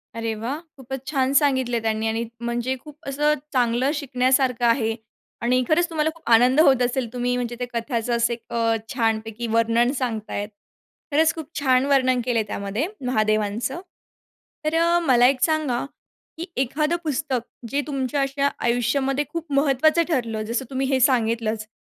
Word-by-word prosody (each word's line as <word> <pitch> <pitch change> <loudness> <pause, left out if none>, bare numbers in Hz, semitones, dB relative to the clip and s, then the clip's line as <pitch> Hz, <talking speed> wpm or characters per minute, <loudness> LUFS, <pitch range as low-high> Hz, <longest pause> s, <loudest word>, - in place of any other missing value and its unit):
अरे 225 -1 -2
वाह! 265 +7 -3 0.2
खूपच 265 0 -7
छान 270 -3 +1
सांगितले 260 -4 +2
त्यांनी 220 0 -1
आणि 225 +1 -1 0.2
म्हणजे 240 +2 -2
खूप 300 +1 -13
असं 295 +2 +2 0.2
चांगलं 245 +2 +2
शिकण्यासारखं 255 -3 +1
आहे 225 -2 +2 0.5
आणि 250 +2 +2
खरंच 345 +3 +3
तुम्हाला 315 -1 0
खूप 320 -8 -9
आनंद 250 +5 +5
होत 265 -5 +5
असेल, 245 0 0
तुम्ही 245 0 0
म्हणजे 240 -1 -3
त्या 245 - -3
कथाचं 235 0 -1
असं 235 0 +1 0.2
अ, 230 -1 +1 0.2
छानपैकी 225 -1 -1
वर्णन 230 +2 +3
सांगतायत. 220 -4 -3 0.6
खरंच 320 +3 +3
खूप 315 -2 -7
छान 260 -1 +3
वर्णन 260 -3 +3
केलंय 230 -3 +1
त्यामध्ये 205 - -2 0.2
महादेवांचं. 215 - 0 0.8
तर 320 +1 +1 0.3
मला 245 -1 +6
एक 260 -1 +1
सांगा, 305 -6 +1 0.5
की 340 - -4 0.2
एखादं 300 +6 0
पुस्तक 285 -3 -1 0.3
जे 285 +1 0
तुमच्या 275 0 -1
अशा 275 +1 0 0.2
आयुष्यामध्ये 265 +4 +1
खूप 335 -3 -6
महत्त्वाचं 290 +4 +3
ठरलं, 230 -7 -1
जसं 235 +4 -2
तुम्ही 265 0 -1
हे 265 -1 +2
सांगितलंच, 225 -4 +1
255 Hz, 150 wpm, -23 LUFS, 230-275 Hz, 0.8 s, मला